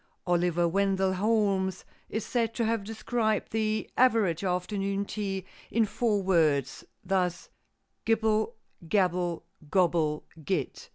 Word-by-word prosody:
Oliver 175 -1 +2
Wendell 190 +1 +1
Holmes 195 -2 +1 0.2
is 220 - -3
said 230 -2 -1
to 230 - 0
have 225 -2 0
described 220 +1 -1
the 215 -1 0
average 220 -9 +3
afternoon 195 +2 -1
tea 195 -3 -3 0.2
in 230 0 +2
four 210 -2 0
words, 155 -8 +2 0.2
thus: 180 -2 0 0.5
"Gibble, 220 0 +1 0.3
gabble, 180 -3 +1 0.3
gobble, 165 -5 +2 0.2
git." 160 -5 -3
195 Hz, 110 wpm, -28 LUFS, 180-220 Hz, 0.5 s, average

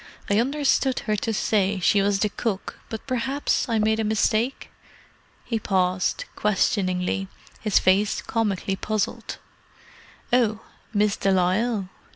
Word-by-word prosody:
"I 205 - +4
understood 270 0 +1
her 215 - 0
to 225 - -2
say 200 -2 +1
she 200 +3 +3
was 200 0 +2
the 210 - +2
cook, 205 -2 -4
but 220 - -6
perhaps 265 +1 -1
I 230 - +1
made 220 +1 +2
a - - +1
mistake?" 220 +3 0 0.7
He 230 -2 -1
paused, 185 -2 0
questioningly, 195 -2 0 0.3
his 210 -3 +2
face 195 +3 +3
comically 210 -4 -1
puzzled. 215 +1 -3 1.0
"Oh—Miss 215 -3 0
de 195 - 0
Lisle?" 190 +2 +1
210 Hz, 125 wpm, -24 LUFS, 195-225 Hz, 1.0 s, I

